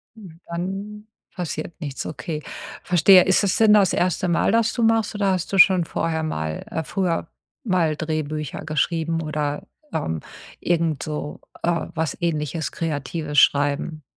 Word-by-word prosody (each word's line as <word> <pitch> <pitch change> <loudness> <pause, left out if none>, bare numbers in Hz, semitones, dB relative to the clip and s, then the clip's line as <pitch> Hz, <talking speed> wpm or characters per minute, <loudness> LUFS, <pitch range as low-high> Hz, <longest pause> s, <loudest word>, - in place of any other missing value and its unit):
Dann 195 +3 -7 0.3
passiert 170 -2 -5
nichts, 140 -3 -5
okay. 150 +2 -5 0.4
Verstehe. 180 +1 +6
Ist 190 +1 +3
es 195 - +1
denn 220 -2 +6
das 200 -3 +5
erste 180 0 +1
Mal, 170 +2 +2
dass 225 0 +2
du 235 - -1
machst, 225 -1 +2
oder 200 -2 +1
hast 185 -1 -2
du - - +2
schon 185 -2 +6
vorher 160 0 -2
mal 80 - -3
äh, 160 - -3
früher 170 -2 -1 0.4
mal 180 - +1
Drehbücher 155 -2 -4
geschrieben 165 +1 0
oder, 150 -1 -2 0.3
ähm, 80 0 -2 0.4
irgendso 155 -3 -2 0.2
äh, 170 -1 0
was 160 -3 -2
Ähnliches, 160 -1 -1
Kreatives 150 -1 -1
schreiben? 145 +2 +2
165 Hz, 140 wpm, -23 LUFS, 155-185 Hz, 0.4 s, Verstehe